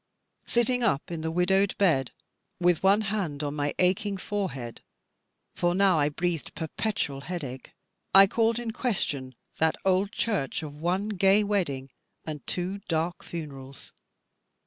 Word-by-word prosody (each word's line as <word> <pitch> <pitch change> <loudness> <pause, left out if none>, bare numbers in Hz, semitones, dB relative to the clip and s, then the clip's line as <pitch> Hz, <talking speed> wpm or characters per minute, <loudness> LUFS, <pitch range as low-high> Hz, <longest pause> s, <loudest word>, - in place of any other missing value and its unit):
Sitting 245 +1 +2
up 195 - 0
in 165 -2 -3
the 160 - -2
widowed 190 +4 +2
bed, 150 -10 +2 0.5
with 175 -2 +3
one 195 +3 +4
hand 195 -9 -2
on 145 -1 -2
my 145 -1 -2
aching 190 +2 +1
forehead 180 - -4 0.7
for 175 0 +1
now 190 -4 +4
I 145 0 +3
breathed 170 +1 -3
perpetual 160 -3 -2
headache 140 -6 -6 0.4
I 195 0 +9
called 225 +3 +1
in 240 -2 -3
question 145 - -1 0.2
that 160 0 +3
old 190 +1 +2
church 200 - -1
of 150 -2 -6
one 180 +7 -1
gay 195 +1 +4
wedding 145 -11 -1 0.3
and 150 -4 -6
two 185 +3 -2
dark 165 +1 -1
funerals. 140 -5 -8
175 Hz, 140 wpm, -27 LUFS, 150-200 Hz, 0.7 s, I